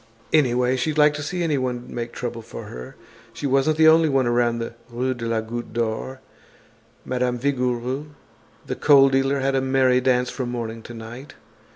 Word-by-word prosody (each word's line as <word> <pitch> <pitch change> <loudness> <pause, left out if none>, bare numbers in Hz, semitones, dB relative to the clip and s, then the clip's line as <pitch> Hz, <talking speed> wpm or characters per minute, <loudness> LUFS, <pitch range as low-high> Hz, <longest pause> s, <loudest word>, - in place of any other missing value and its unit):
Anyway, 125 -4 +3
she'd 150 +4 -1
like 150 0 +5
to 150 - -5
see 175 +4 -3
anyone 130 -6 -1
make 120 0 -4
trouble 120 -1 -5
for 115 - -9
her. 60 0 -9 0.4
She 145 - -6
wasn't 135 +3 +2
the 160 0 +6
only 160 0 +6
one 135 -2 +2
around 120 0 +1
the 115 0 -5 0.2
Rue 125 +2 -1
de 120 -2 -5
la 115 -1 0
Goutte 120 +1 -6
d'Or. 115 +3 -3 0.8
Madame 125 -1 -1
Vigouroux, 125 +1 -1 0.6
the - - -3
coal 140 -2 +6
dealer 135 +1 +1
had 135 +1 +1
a 135 - +2
merry 130 -1 +3
dance 125 -1 +1
from 130 -3 -4
morning 115 -2 -5
to 120 - -10
night. 115 +5 -10
125 Hz, 180 wpm, -23 LUFS, 120-135 Hz, 0.8 s, the